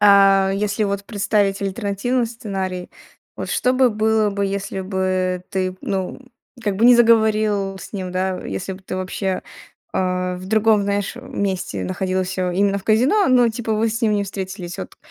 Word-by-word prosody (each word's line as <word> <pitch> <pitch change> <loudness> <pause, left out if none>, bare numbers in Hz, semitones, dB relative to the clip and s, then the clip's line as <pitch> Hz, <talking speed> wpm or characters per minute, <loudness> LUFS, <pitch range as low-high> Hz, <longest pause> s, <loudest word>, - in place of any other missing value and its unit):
а, 195 -1 +6
если 205 +2 -1
вот 200 0 -2
представить 205 -2 0
альтернативный 205 +5 -1
сценарий, 190 -5 -5 0.5
вот - - -5
что 255 - +1
бы 255 -1 +4
было 215 0 +2
бы, 200 0 -1
если 195 0 -3
бы 185 -1 -1
ты, 185 -1 -1
ну, 190 +3 -2 0.4
как 205 -3 -1
бы, 225 - +2
не 245 0 +8
заговорил 215 -4 +3
с - - -10
ним, 185 -3 -4
да, 185 0 -1
если 95 - -4
бы 190 +1 -11
ты 185 - -5
вообще, 185 0 -2 0.5
э, 180 -1 0
в 185 +1 -9
другом, 220 0 +3
знаешь, 200 +2 -1
э, 245 - -8
месте 200 -7 -3
находился, 185 0 -1
именно 200 +2 +1
в 195 - -11
казино, 260 - +3
но 245 -2 +5
типа 225 0 -3
вы 225 +2 +1
с 225 +1 -3
ним 215 -2 +3
не 205 -1 0
встретились? 190 -2 -6
Вот, 190 - -7
200 Hz, 175 wpm, -21 LUFS, 185-220 Hz, 0.5 s, не